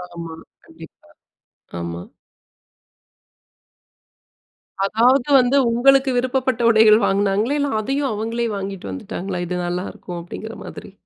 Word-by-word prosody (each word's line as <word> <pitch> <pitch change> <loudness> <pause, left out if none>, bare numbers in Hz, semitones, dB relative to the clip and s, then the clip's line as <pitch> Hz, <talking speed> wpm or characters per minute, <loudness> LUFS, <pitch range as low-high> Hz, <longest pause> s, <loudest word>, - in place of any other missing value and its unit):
ஆமா. 165 -1 -7 0.3
கண்டிப்பா. - - -16 0.7
ஆமா. 85 0 -5 2.8
அதாவது, 240 +6 +3
வந்து 255 +2 +2
உங்களுக்கு 270 +3 +4
விருப்பப்பட்ட 255 -1 0
உடைகள் 220 -1 +6
வாங்குனாங்களா? 205 +7 +1
இல்ல, 285 0 0
அதையும் 270 +4 -1
அவங்களே 230 +2 -2
வாங்கிட்டு 195 - -6
வந்துட்டாங்களா? 180 - -5
இது 180 - -3
நல்லாயிருக்கும் 175 0 -5
அப்படிங்கிற 220 +6 -8
மாதிரி. - - -10
220 Hz, 100 wpm, -20 LUFS, 190-255 Hz, 2.8 s, உடைகள்